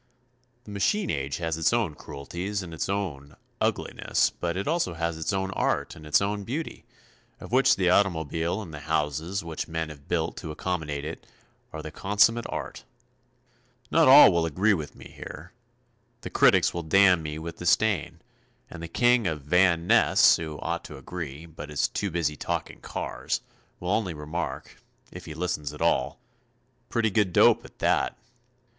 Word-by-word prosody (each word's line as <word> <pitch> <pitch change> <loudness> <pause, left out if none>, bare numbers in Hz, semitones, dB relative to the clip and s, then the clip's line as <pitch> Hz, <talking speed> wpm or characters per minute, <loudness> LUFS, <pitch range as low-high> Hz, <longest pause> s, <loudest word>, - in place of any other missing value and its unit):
The 105 - -11
machine 190 - 0
age 70 0 -2
has 80 -2 -2
its 80 0 +3
own 115 -9 +1
cruelties 90 +9 -5
and 85 -2 -9
its 80 - -3
own, 85 -9 -3 0.3
ugliness, - - 0
but 85 +1 -3
it 100 - -3
also 155 - 0
has 85 0 -2
its 80 0 -2
own 95 0 -1
art - - -1
and 75 - -12
its 75 0 +4
own 100 0 -2
beauty, 145 +10 -5 0.5
of - - -10
which 130 +2 +5
the 90 -2 +2
automobile 85 0 +1
and 85 -5 -11
the 75 - -6
houses 80 +5 -2
which 80 -2 -5
men 80 -1 -3
have 70 -2 -12
built - - -1
to - - -6
accommodate 75 -3 -3
it, 80 - -7 0.4
are - - -7
the - - -7
consummate 110 +4 +2
art. - - -5 1.1
Not 165 -3 +5
all 135 -3 +10
will 85 -1 +1
agree 95 +7 +2
with 75 -6 -4
me - - -13
here. 90 +4 -10 0.7
The - - -7
critics - - +4
will 85 - -3
damn 90 +1 +5
me 75 -1 -5
with 85 +1 -7
disdain, 90 -1 +1 0.5
and 85 - -8
the 85 - -5
King 120 +4 +3
of 75 -4 -3
Van 85 +2 +3
Ness, - - +5
who 80 -2 -6
ought - - -3
to - - -9
agree, 80 -3 -7
but 80 -2 -10
is 75 -2 +1
too 100 - -3
busy 80 -3 -1
talking - - -4
cars, - - -3 0.4
will 90 +1 -3
only 100 -6 0
remark, 75 +3 -5 0.3
if - - -10
he 75 - -8
listens 80 -4 -3
at 75 - -10
all: 80 - +1 0.7
"Pretty 115 -2 +1
good 100 -2 +2
dope - - +5
at - - -15
that." - - +1
85 Hz, 175 wpm, -26 LUFS, 80-100 Hz, 1.1 s, all